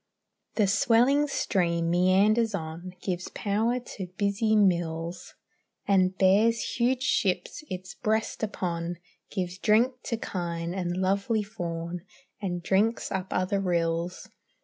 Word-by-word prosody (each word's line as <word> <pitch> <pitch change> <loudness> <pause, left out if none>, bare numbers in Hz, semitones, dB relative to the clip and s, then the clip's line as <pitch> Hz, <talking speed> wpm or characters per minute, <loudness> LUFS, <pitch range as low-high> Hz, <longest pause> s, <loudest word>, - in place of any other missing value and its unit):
The 215 - +3
swelling 240 +8 +4
stream 170 -10 0
meanders 200 +5 +3
on, 170 +2 -6
Gives 180 -1 -2
power 220 +4 0
to 205 -6 -7
busy 205 +2 +1
mills, 170 -3 0 0.5
And 190 -1 +3
bears 215 +5 +3
huge 250 +2 +1
ships 185 +6 0
its 185 +1 -6
breast 220 +1 -1
upon, 175 -5 -2 0.3
Gives 185 -2 -4
drink 230 +5 +4
to 230 - -1
kine 170 -4 -3
and 180 -2 -2
lovely 200 +4 +1
fawn, 175 -4 -5 0.4
And 175 -3 -3
drinks 210 +5 +1
up 190 -1 -2
other 185 +2 0
rills. 170 -1 -1
190 Hz, 120 wpm, -27 LUFS, 175-215 Hz, 0.5 s, swelling